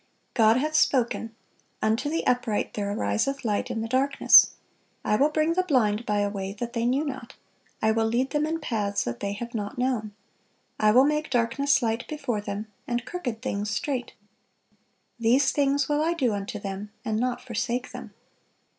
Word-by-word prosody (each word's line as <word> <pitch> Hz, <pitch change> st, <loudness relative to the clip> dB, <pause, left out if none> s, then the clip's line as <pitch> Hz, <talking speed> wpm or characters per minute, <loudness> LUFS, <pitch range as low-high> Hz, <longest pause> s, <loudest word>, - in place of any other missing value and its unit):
God 225 Hz, -1 st, +5 dB
hath 305 Hz, +4 st, -1 dB
spoken: 235 Hz, -6 st, +1 dB, 0.4 s
"Unto 225 Hz, +7 st, 0 dB
the 325 Hz, +2 st, -2 dB
upright 245 Hz, -4 st, 0 dB
there 205 Hz, -1 st, -2 dB
ariseth 270 Hz, +6 st, -1 dB
light 215 Hz, +3 st, 0 dB
in 235 Hz, -2 st, -2 dB
the 225 Hz, -, -3 dB
darkness." 265 Hz, +4 st, +5 dB, 0.5 s
"I 210 Hz, -, +2 dB
will 280 Hz, +7 st, +3 dB
bring 310 Hz, +2 st, +1 dB
the 370 Hz, -, +2 dB
blind 240 Hz, -, +1 dB
by 210 Hz, -1 st, +1 dB
a 205 Hz, -, +1 dB
way 195 Hz, -1 st, -4 dB
that 235 Hz, +3 st, -5 dB
they 235 Hz, -1 st, 0 dB
knew 270 Hz, +5 st, +1 dB
not; 260 Hz, -4 st, -6 dB, 0.5 s
I 220 Hz, -, +4 dB
will 225 Hz, 0 st, +1 dB
lead 245 Hz, +4 st, 0 dB
them 300 Hz, 0 st, +1 dB
in 325 Hz, +1 st, -2 dB
paths 205 Hz, -8 st, -1 dB
that 120 Hz, 0 st, -4 dB
they 200 Hz, 0 st, -2 dB
have 235 Hz, +3 st, -6 dB
not 205 Hz, -1 st, -4 dB
known: 240 Hz, -5 st, -1 dB, 0.6 s
I 215 Hz, -, +4 dB
will 250 Hz, +5 st, +6 dB
make 300 Hz, +1 st, 0 dB
darkness 265 Hz, +3 st, +2 dB
light 225 Hz, +1 st, -1 dB
before 275 Hz, -8 st, -3 dB
them, 205 Hz, +1 st, -4 dB, 0.2 s
and 240 Hz, -2 st, -2 dB
crooked 250 Hz, -9 st, -5 dB
things 205 Hz, +1 st, -2 dB
straight. 260 Hz, +1 st, -2 dB, 1.1 s
These 255 Hz, +4 st, +3 dB
things 285 Hz, 0 st, +1 dB
will 295 Hz, 0 st, +1 dB
I 330 Hz, +2 st, +1 dB
do 255 Hz, -9 st, +1 dB
unto 205 Hz, +3 st, -4 dB
them, 200 Hz, 0 st, -6 dB, 0.2 s
and 220 Hz, -2 st, 0 dB
not 250 Hz, 0 st, -1 dB
forsake 245 Hz, +1 st, -3 dB
them." -, -, -9 dB
240 Hz, 180 wpm, -26 LUFS, 215-275 Hz, 1.1 s, will